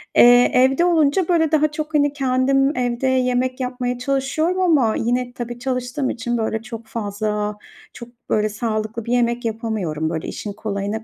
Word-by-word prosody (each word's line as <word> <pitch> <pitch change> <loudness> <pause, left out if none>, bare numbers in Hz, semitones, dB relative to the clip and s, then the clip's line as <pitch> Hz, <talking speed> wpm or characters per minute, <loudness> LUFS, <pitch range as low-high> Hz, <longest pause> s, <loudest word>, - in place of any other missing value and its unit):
Eee, 245 0 +7
evde 265 +6 +4
olunca, 330 0 +2
böyle, 320 -3 +2
daha 305 -1 +4
çok, 305 +1 -5
hani, 290 -1 +2
kendim 270 +1 +1
evde 245 +1 -1
yemek 255 0 +1
yapmaya 250 -1 -2
çalışıyorum 275 +7 0
ama 285 -11 +3
yine 245 +1 -1
tabii 240 0 -6
çalıştığım 255 +1 -2
için, 240 +1 -2
böyle, 220 -1 -2
çok 230 -1 -9
fazla, 210 -1 -3 0.4
çok, 235 - -10 0.2
böyle, 215 0 +1
sağlıklı 215 +1 -3
bir 235 - -1
yemek 240 0 +1
yapamıyorum, 215 -9 -2
böyle, 160 -1 -4
işin 205 - -6
kolayına 205 +1 -4
245 Hz, 160 wpm, -21 LUFS, 220-270 Hz, 0.4 s, Eee